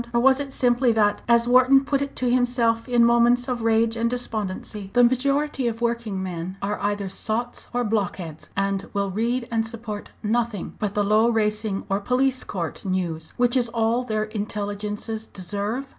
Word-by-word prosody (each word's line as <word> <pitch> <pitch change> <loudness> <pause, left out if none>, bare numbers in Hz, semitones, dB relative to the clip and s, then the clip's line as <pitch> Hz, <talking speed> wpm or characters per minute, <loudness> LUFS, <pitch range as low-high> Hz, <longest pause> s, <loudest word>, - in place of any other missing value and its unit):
Or - - +5
was 265 +2 +5
it 280 -1 -4
simply 245 -1 +2
that, 210 -2 +2
as 235 0 +4
Wharton 255 +2 +5
put 280 -1 0
it 280 0 -4
to 255 - -1
himself 245 -1 +1
in 240 -1 +5
moments 235 +1 +4
of 250 -2 -2
rage 225 0 +2
and 230 0 0
despondency, 210 -4 -4
the 245 0 +5
majority 275 +2 +1
of 230 -1 -3
working 235 -5 -2
men 180 +1 -5
"are 205 +1 -2
either 205 -1 -1
sots 225 +5 -2
or 245 0 0
block 210 -4 0
heads, 160 -4 -9
and 195 0 -1
will 200 -1 0
read 235 +4 -1
and 225 -1 0
support 225 -2 -6
nothing 225 -2 -1
but 205 -2 -2
the 205 - +2
low 215 +3 +4
racing 215 -2 0
or 195 +1 0
police 255 +4 +1
court 170 -4 -5
news, 175 -4 -2
which 245 +1 +3
is 245 -2 +2
all 230 +1 +1
their 215 -3 -1
intelligences 210 +1 -4
deserve?" 205 +7 -3
225 Hz, 180 wpm, -24 LUFS, 205-245 Hz, -, Or